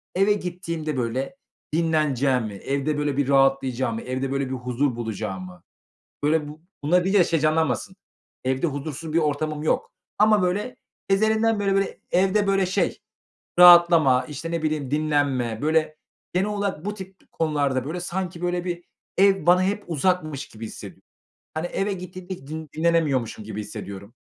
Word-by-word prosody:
eve 195 Hz, +3 st, +4 dB
gittiğimde, 170 Hz, -6 st, -4 dB
böyle, 125 Hz, -, -2 dB, 0.4 s
dinleneceğimi, 140 Hz, -8 st, +1 dB
evde, 140 Hz, +7 st, -2 dB
böyle, 145 Hz, -2 st, -1 dB
bir 145 Hz, -, +1 dB
rahatlayacağımı, 130 Hz, -3 st, +2 dB
evde, 130 Hz, +1 st, -3 dB
böyle, 140 Hz, 0 st, 0 dB
bir 130 Hz, -, -2 dB
huzur 125 Hz, +1 st, -1 dB
bulacağımı, 95 Hz, -6 st, -5 dB, 0.6 s
böyle, 150 Hz, 0 st, +2 dB
bu 150 Hz, +1 st, -11 dB, 0.2 s
bunları 175 Hz, +4 st, +3 dB
deyince 190 Hz, -1 st, +4 dB
şey 165 Hz, -, 0 dB
canlanmasın, 155 Hz, +3 st, 0 dB, 0.5 s
evde 130 Hz, +4 st, +1 dB
huzursuz 150 Hz, +1 st, -5 dB
bir 165 Hz, -, +3 dB
ortamım 150 Hz, -1 st, -1 dB
yok. 155 Hz, -, 0 dB, 0.3 s
Ama, 210 Hz, -2 st, +5 dB
böyle, 200 Hz, +7 st, -1 dB, 0.3 s
ezelinden 220 Hz, +2 st, +3 dB
beri, 195 Hz, -1 st, +1 dB
böyle, 195 Hz, 0 st, -1 dB
evde, 195 Hz, +3 st, +3 dB
böyle, 195 Hz, -1 st, +2 dB
şey 185 Hz, -, 0 dB, 0.6 s
rahatlama, 170 Hz, -7 st, +7 dB
işte, 150 Hz, +2 st, -6 dB
ne 165 Hz, -1 st, -2 dB
bileyim, 150 Hz, -4 st, -1 dB
dinlenme, 145 Hz, -7 st, 0 dB
böyle, 155 Hz, 0 st, +1 dB, 0.4 s
genel 185 Hz, +3 st, +1 dB
olarak 200 Hz, -5 st, -2 dB
bu 205 Hz, -, -2 dB
tip 190 Hz, -2 st, -12 dB
konularda, 145 Hz, -5 st, 0 dB
böyle, 160 Hz, +5 st, -4 dB
sanki, 175 Hz, -1 st, -4 dB
böyle, 175 Hz, 0 st, -1 dB
bir 175 Hz, -1 st, -4 dB, 0.3 s
ev 195 Hz, 0 st, +4 dB
bana 180 Hz, +1 st, +5 dB
hep 200 Hz, +2 st, -1 dB
uzakmış 160 Hz, -3 st, -1 dB
gibi 110 Hz, +1 st, -8 dB
hissed -, -, -9 dB, 0.6 s
Hani, 160 Hz, +2 st, -2 dB
eve 195 Hz, +3 st, -1 dB
gittiğimde 180 Hz, -4 st, -7 dB
dinlenemiyormuşum 155 Hz, -9 st, +1 dB
gibi 110 Hz, -1 st, -5 dB
hissediyorum. 100 Hz, 0 st, -8 dB
155 Hz, 145 wpm, -24 LUFS, 135-180 Hz, 0.6 s, rahatlama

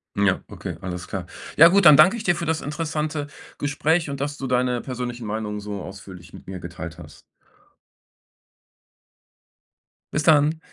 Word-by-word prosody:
Ja, 100 Hz, -2 st, +2 dB
okay, -, -, -7 dB
alles 90 Hz, -1 st, -6 dB
klar. 95 Hz, -3 st, -5 dB, 0.3 s
Ja 165 Hz, +3 st, +9 dB
gut, 200 Hz, +3 st, +3 dB
dann 150 Hz, -2 st, +9 dB
danke 155 Hz, +8 st, +7 dB
ich 225 Hz, -, -6 dB
dir 175 Hz, -4 st, +2 dB
für 170 Hz, -, -4 dB
das 160 Hz, 0 st, -1 dB
interessante 150 Hz, -1 st, -3 dB, 0.3 s
Gespräch 150 Hz, +2 st, 0 dB
und 140 Hz, -, -5 dB
dass 145 Hz, +1 st, -3 dB
du 135 Hz, -, -5 dB
deine 125 Hz, -1 st, +1 dB
persönlichen 125 Hz, -2 st, -5 dB
Meinungen 105 Hz, 0 st, -3 dB
so 105 Hz, -1 st, -6 dB
ausführlich 95 Hz, -2 st, -11 dB
mit -, -, -12 dB
mir 95 Hz, -1 st, -6 dB
geteilt 85 Hz, -1 st, -8 dB
hast. 75 Hz, -2 st, -13 dB, 2.9 s
Bis 150 Hz, -, +1 dB
dann. 155 Hz, 0 st, +4 dB
130 Hz, 155 wpm, -23 LUFS, 95-155 Hz, 2.9 s, Ja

